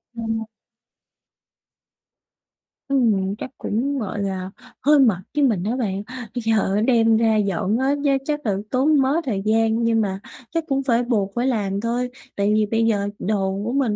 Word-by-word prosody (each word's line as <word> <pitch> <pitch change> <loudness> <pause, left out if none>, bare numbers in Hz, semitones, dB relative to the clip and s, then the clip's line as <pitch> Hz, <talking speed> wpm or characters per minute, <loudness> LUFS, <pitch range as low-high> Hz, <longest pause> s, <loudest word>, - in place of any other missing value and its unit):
Ồ. 225 -1 -3 2.4
Ừm, 215 -8 +1
chắc - - -6
cũng, 270 +6 -1
gọi 205 -2 -3
là, 190 -1 -3 0.3
hơi 295 +2 +5
mệt 230 -9 +4 0.2
với 295 - +2
mình 215 -9 +2
á 220 +5 -1
bạn. 200 -6 -2
Bây 245 -2 -7
giờ 220 -3 +1
á, 210 - +2
đem 225 -2 +4
ra 225 -1 +3
dọn 200 0 0
á, 265 +1 +2
giá 280 -1 +3
chắc 295 -2 -2
là 205 -3 +1 0.2
tốn 280 +3 +3
mớ 265 +2 +2
thời 210 -7 -1
gian 225 +1 +2
nhưng 230 -1 +2
mà 195 -2 -2 0.3
chắc 330 0 -1
cũng 275 -1 0
phải 245 -2 +2
buộc 210 -5 0
phải 240 +2 0
làm 205 -5 -1
thôi, 240 +2 -1 0.3
tại 200 +1 +1
vì 215 0 +3
bây 225 +2 +1
giờ 205 -3 +1
đồ 195 -1 -1
của 230 - -2
mình 255 -5 +1
225 Hz, 180 wpm, -22 LUFS, 205-255 Hz, 2.4 s, hơi